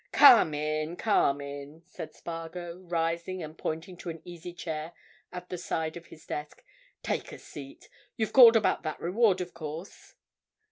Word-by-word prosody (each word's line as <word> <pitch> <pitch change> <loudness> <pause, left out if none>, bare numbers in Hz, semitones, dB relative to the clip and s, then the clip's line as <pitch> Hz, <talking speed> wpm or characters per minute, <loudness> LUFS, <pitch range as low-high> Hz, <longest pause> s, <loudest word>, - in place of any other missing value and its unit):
"Come 240 - +8
in, 155 +2 -2
come 145 -9 +2
in!" 140 +3 -8
said 180 - -9
Spargo, 170 +1 -7
rising 170 0 -2
and 155 0 -8
pointing 165 +4 -4
to 175 - -7
an 165 0 -6
easy 175 0 -8
chair 160 -1 -5 0.4
at 180 0 -8
the 180 - -4
side 160 -2 -2
of 170 0 -10
his 155 - -14
desk. 150 0 -6 0.4
"Take - - -2
a - - -8
seat. - - -11 0.3
You've 220 -3 -1
called 240 -3 +10
about 220 - +3
that 155 -2 -4
reward, 190 +1 +2
of 180 -1 -6
course." 160 +3 -8
170 Hz, 160 wpm, -29 LUFS, 155-180 Hz, 0.4 s, called